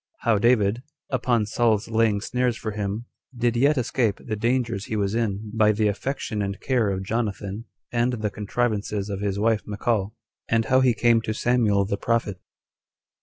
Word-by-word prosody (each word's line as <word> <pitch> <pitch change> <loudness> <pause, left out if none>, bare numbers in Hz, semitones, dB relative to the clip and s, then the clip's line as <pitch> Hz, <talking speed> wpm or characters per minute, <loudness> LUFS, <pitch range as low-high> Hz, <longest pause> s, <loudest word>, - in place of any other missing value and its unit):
How 115 -3 +2
David, 115 -1 +3 0.3
Upon 120 -4 +1
Saul's 110 0 +1
Laying 110 -3 +2
Snares 125 0 0
For 110 - -4
Him, 105 +2 -3 0.3
Did 120 0 +1
Yet 140 +5 +3
Escape 120 -3 0
The 110 - -4
Dangers 115 -2 0
He 110 - -4
Was 100 -1 0
In 110 -2 -2
By 110 -1 +4
The 105 0 +1
Affection 110 0 -3
And 100 -1 -3
Care 120 -5 +1
Of 95 -1 -2
Jonathan 105 -1 -3 0.3
And 120 +1 +1
The 110 -3 -2
Contrivances 105 -1 -2
Of 100 - -3
His 100 -1 -1
Wife 110 +1 +2
Michal: 105 0 -1 0.3
And 115 -1 +2
How 130 +3 +4
He 125 -3 +3
Came 115 -1 +3
To 110 - -3
Samuel 110 -5 +2
The 100 +1 -2
Prophet. 115 -5 -1
110 Hz, 170 wpm, -24 LUFS, 105-120 Hz, 0.3 s, By